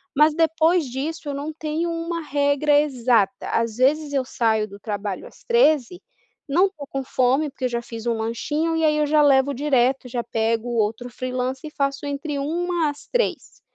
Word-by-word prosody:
Mas 300 +2 +5
depois 325 +1 +3
disso 290 +5 -4
eu - - -2
não 290 +3 -4
tenho 315 +2 -2
uma 335 0 -3
regra 290 0 +2
exata. 250 -5 +1
Às 230 -1 -1
vezes 290 +4 +2
eu 270 -2 +1
saio 220 -4 +1
do 200 0 -12
trabalho 205 -3 -4
às - - -18
13h, 350 - +2 0.5
não 335 +7 +4
estou 340 -7 -10
com 270 -1 -4
fome, 260 +4 +1
porque 265 -1 -5
eu - - +1
já 235 -1 -2
fiz 230 -1 -8
um 235 - +1
lanchinho, 295 +9 -1
e 325 - 0
aí 305 -1 +3
eu 300 - +2
já 300 +1 +4
levo 280 -1 +4
direto, 265 -2 +1
já 240 -1 -2
pego 225 +1 -1
outro 225 +1 -1
freelancer 255 +3 -4
e 300 - -28
faço 275 0 -1
entre 285 +1 -3
13h 335 +2 0
às 290 0 -9
15h. 485 -1 -2
280 Hz, 190 wpm, -23 LUFS, 245-310 Hz, 0.5 s, Mas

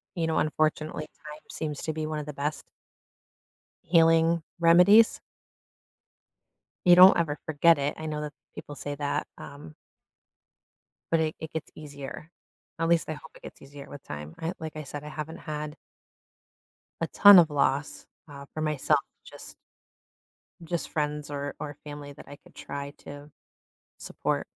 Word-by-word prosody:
you 170 -2 -1
know, 160 - 0
unfortunately, 155 0 -1 0.2
time 150 0 -9
seems 150 -2 -4
to 155 - -2
be 155 0 -3
one 155 -1 -3
of 150 - -6
the 150 - -7
best 145 +1 -3 1.2
healing 165 0 +4 0.2
remedies. 180 +7 +6 1.7
You 175 - +9
don't 185 +1 +9
ever 155 -3 -1
forget 160 +1 +4
it, 140 +1 -1
I 160 - -5
know 150 -1 -3
that 150 0 -5 0.2
people 145 - -9
say 145 +1 -5
that, 145 0 -2
um 145 +2 -11 1.4
but 165 - +4
it 155 -1 -1
it 160 - -7
gets 160 0 -5
easier. 145 +1 -9 0.5
At 165 0 0
least 170 -1 +2
I - - -2
hope 155 +1 -13
it - - -17
gets - - -11
easier 140 +1 -12
with 145 - -10
time. 75 +1 -8
I 165 +2 -2
like 155 -1 -7
I 155 - -6
said, 145 +2 -7
I 150 - -7
haven't 155 +1 -7
had 150 -1 -6 1.3
a 165 - +1
ton 205 -2 +9
of 165 -2 +6
loss, 145 0 -1 0.2
uh, 140 -1 -10
for 155 - -5
myself, 150 -3 +1 0.2
just - - -12 1.1
just 170 +1 -3
friends 150 -1 -3
or 145 0 -4
or 145 -2 -6
family 145 -1 -8
that - - -14
I 145 - -10
could - - -22
try 140 0 -7
to 145 +1 -11 0.7
support. - - -3
150 Hz, 160 wpm, -27 LUFS, 145-160 Hz, 1.7 s, You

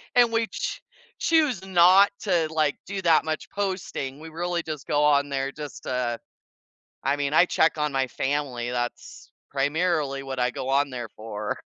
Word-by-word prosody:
and 240 -2 +5
we 230 -1 +1
ch - - -4 0.4
choose 300 - +2
not 185 +2 +6
to, 175 -6 +1
like, 155 -2 +2
do 195 0 -4
that 165 -4 +4
much 155 0 -3
posting, 185 -8 -3
we 160 +1 -9
really 175 +1 -2
just 155 -3 -6
go 145 0 +2
on 145 -1 +3
there 135 0 -2
just, 150 -1 -9
uh 125 -2 -1 0.9
I 140 +1 +2
mean, 145 0 -2
I 170 - +6
check 160 -2 +2
on 150 -1 0
my 135 -1 0
family 130 -3 -2
that's 120 0 -5 0.2
primarily 145 -1 0
what 135 -1 -5
I 125 0 +2
go 130 - -5
on 140 +1 +2
there 120 -4 -6
for. 105 -1 -4
150 Hz, 175 wpm, -25 LUFS, 135-175 Hz, 0.9 s, not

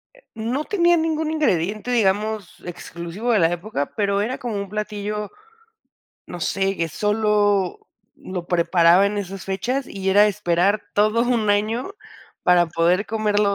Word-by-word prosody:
Eh, - - -23
no 240 +7 -2
tenía 345 -4 +3
ningún 320 -1 -1
ingrediente, 215 - 0
digamos, 210 -3 0
exclusivo 175 +5 -4
de 220 - +4
la 165 -1 +3
época, 175 -5 -4
pero 200 -2 +1
era 235 +5 -2
como 235 -4 -4
un 200 -1 -4
platillo, 210 0 -4 1.0
no 175 - -8
sé, 195 +3 0
que 165 0 -1
solo 210 - +1 0.3
lo 180 -2 -7
preparaba 175 +1 +4
en 205 0 -2
esas 195 -1 -6
fechas 245 +8 -2
y 195 -1 -4
era 205 +2 +6
esperar 200 0 +1
todo 215 +3 +3
un 235 -4 +1
año 220 - 0 0.5
para 175 -1 +4
poder 175 +4 +1
comerlo 210 -2 +1
205 Hz, 145 wpm, -22 LUFS, 185-220 Hz, 1.0 s, era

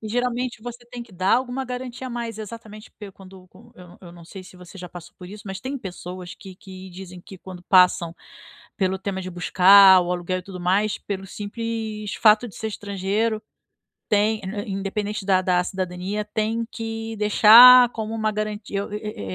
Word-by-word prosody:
E 220 - -8
geralmente 245 0 -2
você 240 0 -9
tem 245 -1 -7
que 235 - -17
dar 185 +2 +1
alguma 255 +1 -2
garantia 250 0 -7
a - - -7
mais, 235 -2 -5
exatamente, 215 0 -10
porque 205 -2 -11
quando 185 -1 -16
quan 230 +6 -20
eu 180 -1 -15
eu 175 -2 -13
não 170 -1 -14
sei 190 +2 -11
se 185 0 -15
você 180 +2 -14
já 180 0 -8
passou 175 0 -12
por 180 -1 -11
isso, 205 +1 -11
mas 195 0 -6
tem 270 +2 -5
pessoas 180 -4 -8
que 190 -3 -13
que 190 0 -12
dizem 180 0 -11
que 190 - -13
quando 180 -1 -11
passam 180 -3 +3 0.6
pelo 190 -1 -1
tema 190 -1 -4
de 185 - -7
buscar 185 +1 +6
o 175 - -3
aluguel 180 +1 -3
e - - -10
tudo 185 -2 -10
mais, 195 +4 0
pelo 195 -1 -6
simples 215 0 -5
fato 215 +2 +4
de 205 - -14
ser 220 - -5
estrangeiro, 205 +2 -2 0.7
tem 215 +1 +1
ind 205 +2 -6
independente 205 0 -4
da 185 -1 +3
da 180 -1 +1
cidadania, 185 +3 -4
tem 220 +2 -2
que 225 -1 -6
deixar 235 +4 +8
como 220 -1 -5
uma 220 -1 -1
garantia 210 -1 -4
o - - -9
e - - -2
é 210 - -8
205 Hz, 195 wpm, -22 LUFS, 185-225 Hz, 0.7 s, deixar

